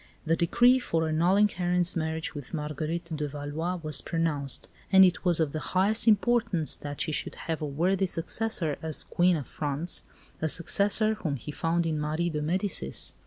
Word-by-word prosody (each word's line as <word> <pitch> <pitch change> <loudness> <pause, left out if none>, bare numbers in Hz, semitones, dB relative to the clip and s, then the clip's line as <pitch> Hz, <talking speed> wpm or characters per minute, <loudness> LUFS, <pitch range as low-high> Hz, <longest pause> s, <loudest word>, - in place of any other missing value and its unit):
The 165 +1 +2
decree 245 +10 +4
for 165 -9 -1
annulling 180 +6 +3
Henri's 180 -2 0
marriage 160 -1 -2
with 145 +1 -7
Marguerite 155 +2 -4
de 150 -1 -2
Valois 145 +5 -4
was 155 -3 +2
pronounced; 155 -5 -1 0.2
and 190 0 +8
it 180 - 0
was 175 -3 +3
of 155 -3 +1
the 155 - -3
highest 200 +8 +1
importance 215 -6 +2
that 145 -1 -7
she 160 - -1
should - - -2
have 160 -2 -4
a 150 - -2
worthy 180 +7 +1
successor 175 -2 -1
as 160 -2 -4
Queen 180 0 +2
of 145 - -6
France 150 +3 -3 0.4
a 160 - 0
successor 200 +6 +2
whom 165 -9 -3
he 140 +3 -7
found 165 +3 0
in 155 -2 -1
Marie 155 +3 -1
de 150 -1 -2
Medicis. 170 - -1
165 Hz, 175 wpm, -28 LUFS, 150-185 Hz, 0.4 s, and